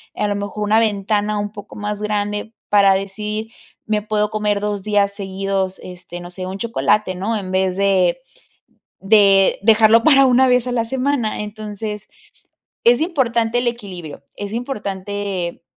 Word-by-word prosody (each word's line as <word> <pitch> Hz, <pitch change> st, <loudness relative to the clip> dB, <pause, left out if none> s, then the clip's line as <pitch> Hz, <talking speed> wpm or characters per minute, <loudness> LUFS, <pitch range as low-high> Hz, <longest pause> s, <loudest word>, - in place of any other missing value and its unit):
a 210 Hz, -, 0 dB
lo 205 Hz, -, -1 dB
mejor, 205 Hz, +1 st, -4 dB
una 215 Hz, +2 st, +3 dB
ventana 210 Hz, -1 st, 0 dB
un 205 Hz, 0 st, -3 dB
poco 205 Hz, -1 st, -11 dB
más 210 Hz, 0 st, -4 dB
grande 210 Hz, +1 st, -2 dB, 0.2 s
para 200 Hz, -2 st, +5 dB
decir, 210 Hz, +3 st, -4 dB, 0.3 s
me 215 Hz, -1 st, 0 dB
puedo 210 Hz, 0 st, 0 dB
comer 210 Hz, -1 st, 0 dB
2 205 Hz, -1 st, -2 dB
días 205 Hz, -1 st, +2 dB
seguidos, 195 Hz, -1 st, -3 dB
este, 180 Hz, -1 st, -9 dB
no 175 Hz, 0 st, -10 dB
sé, 185 Hz, 0 st, -6 dB
un 190 Hz, +1 st, -5 dB
chocolate, 215 Hz, -3 st, 0 dB
¿no? 215 Hz, +5 st, -2 dB
En 185 Hz, -2 st, -6 dB
vez 190 Hz, 0 st, 0 dB
de 195 Hz, -2 st, +2 dB, 0.9 s
de 195 Hz, -2 st, +5 dB
dejarlo 225 Hz, +1 st, +5 dB
para 275 Hz, -2 st, +6 dB
una 260 Hz, +1 st, +4 dB
vez 250 Hz, -1 st, +2 dB
a -, -, -2 dB
la 235 Hz, -2 st, 0 dB
semana. 255 Hz, -2 st, -1 dB
Entonces, 210 Hz, 0 st, -6 dB, 0.8 s
es 240 Hz, +1 st, +5 dB
importante 245 Hz, -8 st, +1 dB
el 245 Hz, -, -1 dB
equilibrio, 180 Hz, -11 st, -7 dB
es 205 Hz, 0 st, -6 dB
importante 200 Hz, -7 st, -4 dB
210 Hz, 155 wpm, -19 LUFS, 195-225 Hz, 0.9 s, para